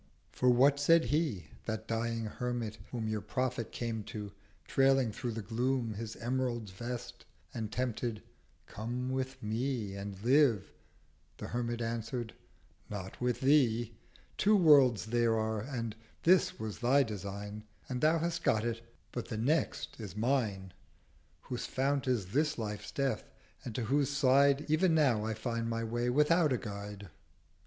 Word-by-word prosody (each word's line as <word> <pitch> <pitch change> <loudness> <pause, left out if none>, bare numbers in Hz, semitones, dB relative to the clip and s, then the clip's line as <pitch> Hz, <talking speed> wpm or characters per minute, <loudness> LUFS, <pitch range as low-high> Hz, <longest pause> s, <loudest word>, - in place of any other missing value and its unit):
280 - - -18
For 125 - +5
what 140 +2 +5
said 165 +3 +5
He, 145 - 0 0.2
that 110 -1 -4
dying 115 0 -1
Hermit, 115 -1 -3
whom 115 -3 -3
Your 110 -1 -1
Prophet 125 +2 -2
came 115 -2 -3
to, 105 -2 -6 0.4
trailing 135 -3 +3
through 120 +2 -4
the 110 -1 -5
Gloom 120 +2 0
His 110 +1 -6
Emerald 120 -3 -2
Vest, 120 +4 -6 0.3
and 110 -3 -4
tempted—'Come 120 0 -4
with 130 -1 -3
Me, 110 -1 -2
And 100 -1 -6
Live.' 125 -6 +4 0.7
The - - -6
Hermit 120 -1 -2
answered—'Not 115 -4 -6
with 125 0 0
Thee. 120 -5 +3 0.4
Two 210 +2 +5
Worlds 140 - +6
there 115 0 +2
are, 110 -1 -1
and 115 -3 -4 0.3
This 185 +1 +4
was 110 -2 -5
thy 135 +3 +4
Design, 105 -1 -6 0.2
And 125 -1 -3
thou 155 +2 +4
hast 170 +1 -2
got 110 +1 +2
it; 115 -1 -2 0.3
but 120 - -4
The 110 - -4
Next 140 +5 0
is 105 -3 -7
mine; 105 -6 0 0.7
Whose 125 -2 -5
Fount 135 +1 0
is 110 -8 0
this 150 +1 +2
life's 105 -1 -4
Death, 135 -1 -1 0.3
and 115 - -6
to 125 - -1
whose 140 +4 +2
Side 140 +1 +4
Ev'n 160 +2 +3
now 130 -9 +3
I 110 0 -2
find 115 +1 -2
my 115 0 -1
Way 120 +2 -1
without 150 +4 +4
a 125 - +2
Guide.' 100 -2 -7
120 Hz, 150 wpm, -32 LUFS, 110-135 Hz, 0.7 s, Worlds